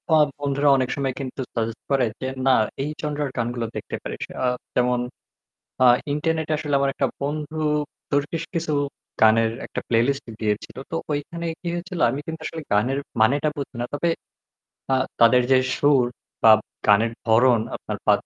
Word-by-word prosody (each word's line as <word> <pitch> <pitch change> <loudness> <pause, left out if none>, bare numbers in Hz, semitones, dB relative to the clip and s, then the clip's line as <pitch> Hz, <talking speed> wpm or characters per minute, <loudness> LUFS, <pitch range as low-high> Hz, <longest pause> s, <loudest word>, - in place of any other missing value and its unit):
আ - - +7 0.2
বন্ধুরা 145 0 +2
অনেক 130 -1 0
সময় 135 -2 -1
কিন্তু 135 0 -5
সাজেস্ট 115 0 -2
করে, 135 -2 +3 0.2
যে 130 - -2 0.2
না 130 - +6 0.3
এই 145 - -2
জনরার 150 -1 -2
গানগুলো 120 0 -1
দেখতে - - -5
পারিস। - - -5 0.2
আ - - +3 0.3
যেমন 125 0 +2 0.8
আ - - +7 0.3
ইন্টারনেটে 160 +1 -1
আসলে 150 -2 -3
আমার 140 0 +2
একটা - - +1
বন্ধু 150 +2 -3 0.5
তুর্কিশ 145 +3 0
কিছু 165 -3 -1 0.5
গানের 110 0 +5
একটা - - -5
প্লেলিস্ট 120 +4 +2
দিয়েছিল। 105 -1 -2
তো - - -2 0.2
ঐখানে 160 +4 -3 0.2
কি 175 - -6
হয়েছিল? 175 0 -5
আমি 135 +4 -2
কিন্তু 160 0 -5
আসলে 160 - -5
গানের 125 +7 +2 0.2
মানেটা 140 +7 +3
বুঝি 140 -2 -5
না। - - 0
তবে 145 +4 +1 0.8
আ - - +5 0.3
তাদের 120 +2 +6
যে 130 - +7 0.2
সুর 145 -3 +4 0.4
বা 110 - +9 0.3
গানের 110 +3 +4
ধরন 115 +1 +5 0.2
আপনার - - -5
বা - - +6
135 Hz, 160 wpm, -23 LUFS, 120-150 Hz, 0.8 s, বা